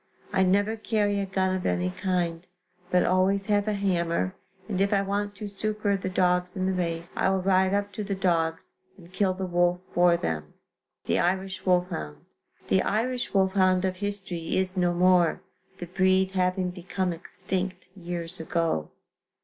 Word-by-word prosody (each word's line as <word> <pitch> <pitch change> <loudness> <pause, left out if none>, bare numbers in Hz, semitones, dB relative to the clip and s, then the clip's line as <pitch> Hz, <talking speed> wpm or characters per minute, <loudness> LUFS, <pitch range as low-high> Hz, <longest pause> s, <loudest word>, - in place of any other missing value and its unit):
I 190 - +3
never 200 +4 +2
carry 210 -2 0
a 195 - -2
gun 190 -1 0
of 185 - -3
any 90 0 0
kind, 175 - -2 0.4
but 180 -1 +3
always 190 +2 +2
have 205 0 +1
a 215 - +1
hammer, 170 - 0 0.3
and 195 -3 -1
if 200 +1 +2
I 200 -1 +3
want 205 +1 -2
to 210 +1 -6
succor 210 0 -1
the 190 -1 -3
dogs 180 -1 +1
in 185 - 0
the 190 - +1
race, 170 -2 -2
I - - +2
will 190 -1 0
ride 190 0 +3
up 205 0 -2
to 210 - -4
the 200 -1 -2
dogs 165 -3 0 0.2
and 175 -1 -16
kill 190 -1 +1
the 190 0 -3
wolf 175 0 +2
for 175 -1 +5
them. 75 - -4 0.5
THE - - +1
IRISH 190 +2 -1
WOLFHOUND. 175 - 0 0.5
The 95 - +3
Irish 245 +4 -1
wolfhound 190 -1 +3
of 185 -1 -1
history 195 -4 -3
is 185 0 0
no 180 -1 +2
more, 180 -2 +3 0.3
the 175 - -6
breed 190 +1 +2
having 185 -1 0
become 180 0 -2
extinct 185 +2 -4
years 175 -1 -5
ago. 160 - -1
185 Hz, 170 wpm, -27 LUFS, 175-195 Hz, 0.5 s, for